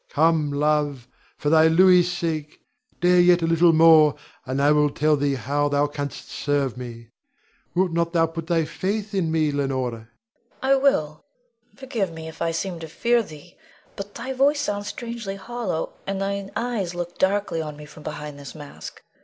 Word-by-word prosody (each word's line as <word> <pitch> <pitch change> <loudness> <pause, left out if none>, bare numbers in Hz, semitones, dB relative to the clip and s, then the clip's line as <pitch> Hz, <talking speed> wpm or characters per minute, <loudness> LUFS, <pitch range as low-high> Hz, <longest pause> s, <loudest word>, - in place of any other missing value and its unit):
Come, 160 0 +2
love, 145 -3 0 0.3
for 145 - -1
thy 160 0 +6
Louis's 180 +1 +5
sake, 160 -4 -3 0.4
dare 180 0 +5
yet 175 -1 +5
a - - +3
little 165 +1 +4
more, 160 -2 +6 0.3
and 130 +2 -2
I 145 +1 +4
will 150 0 +4
tell 150 +2 +2
thee 140 -1 0
how 145 +4 -1
thou 145 0 +2
canst 145 -1 -6
serve 140 -3 -1
me. 115 -2 -9 0.7
Wilt 180 -1 +1
thou 170 0 +3 0.2
not 165 - -9
put 165 0 -5
thy 165 -2 +1
faith 205 +5 -3
in 180 -5 0
me, 155 -2 +1
Leonore? 135 -3 -1
Leonore. 115 -1 -11 0.5
I 265 +1 +4
will. 265 - +1 0.5
Forgive 235 -9 -3
me, 160 0 -8
if 160 - -11
I 170 - +1
seem 170 +1 -3
to 165 - -7
fear 235 +9 +1
thee; 175 -3 -12 0.4
but 200 +1 -8
thy 255 +3 -4
voice 285 +3 +2
sounds 205 -6 -3
strangely 230 -3 -5
hollow, 195 -4 -4
and 195 0 -2
thine 200 0 -3
eyes 215 -6 -2
look 175 0 -6
darkly 190 -3 +1
on 150 -2 -6
me 150 - -10
from 150 +1 -14
behind 150 -1 -7
this 140 +2 -10
mask. 145 -2 -10
165 Hz, 180 wpm, -23 LUFS, 145-195 Hz, 0.7 s, thy